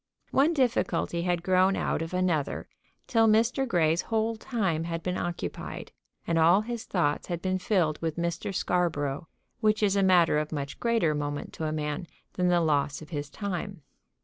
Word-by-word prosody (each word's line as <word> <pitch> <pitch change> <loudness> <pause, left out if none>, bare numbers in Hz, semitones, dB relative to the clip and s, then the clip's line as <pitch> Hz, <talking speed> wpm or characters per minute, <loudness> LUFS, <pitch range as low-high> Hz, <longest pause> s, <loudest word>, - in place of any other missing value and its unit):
One 295 +5 +3
difficulty 240 - +1
had 175 -1 0
grown 185 +1 +3
out - - -1
of 165 - -4
another 180 -6 -1 0.4
till 225 -2 +3
Mr. 230 +5 +3
Grey's 165 -5 +2
whole 225 0 -1
time 195 -9 -1
had 165 0 -4
been 180 0 -1
occupied; 175 -1 -5 0.3
and 165 -1 +1
all 170 +5 +5
his 235 +1 -5
thoughts 160 -6 0
had 175 -2 -3
been 185 +1 -1
filled 180 -6 +1
with 160 -1 -2
Mr. 170 +3 -2
Scarborough, 165 -5 -1 0.3
which 215 -1 +2
is 200 -1 +3
a 200 - +3
matter 175 -5 +4
of 150 0 -3
much 140 -2 -4
greater 230 -10 +2
moment 145 -1 -4
to 160 - -4
a 155 - -1
man 150 +2 -3 0.3
than 180 -1 +1
the 175 -1 +3
loss 145 -1 0
of 155 - -14
his 145 -3 -4
time. 195 -2 -5
175 Hz, 175 wpm, -28 LUFS, 155-200 Hz, 0.4 s, all